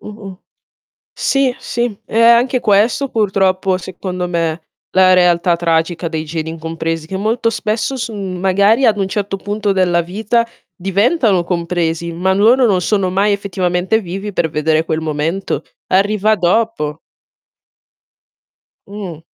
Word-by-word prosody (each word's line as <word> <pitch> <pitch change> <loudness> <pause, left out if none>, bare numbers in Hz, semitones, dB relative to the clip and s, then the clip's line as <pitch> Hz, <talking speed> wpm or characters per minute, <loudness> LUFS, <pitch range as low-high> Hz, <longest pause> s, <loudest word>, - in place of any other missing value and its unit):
mh-mh. 200 -3 -10 0.7
Sì, 275 -2 +1
sì, 235 -4 -3
è 225 - -1
anche 235 +2 +4
questo 225 +6 +2
purtroppo 190 -4 +1
secondo 180 0 -5
me, 165 -1 -1 0.3
la 185 0 +5
realtà 175 -1 +3
tragica 170 0 0
dei 160 -1 -3
geni 160 0 -4
incompresi, 165 0 -4
che 190 - -4
molto 225 +4 0
spesso 225 +4 -2
son 205 -6 -4
magari 200 +7 +3
ad 215 -2 +3
un 195 -1 -1
certo 200 0 -2
punto 205 +1 -2
della 180 -3 +2
vita 220 +7 -1 0.3
diventano 200 - +1
compresi, 170 -1 -2
ma 185 +3 0
loro 230 +6 +4
non 195 -5 +2
sono 190 0 0
mai 200 +3 +2
effettivamente 190 0 0
vivi, 195 +2 -6
per 165 - 0
vedere 155 +1 +1
quel 160 -1 -2
momento. 160 +4 -2 0.3
Arriva 205 +3 +2
dopo. 180 -5 0 1.9
Mh. 195 -6 -7
190 Hz, 130 wpm, -16 LUFS, 170-215 Hz, 1.9 s, la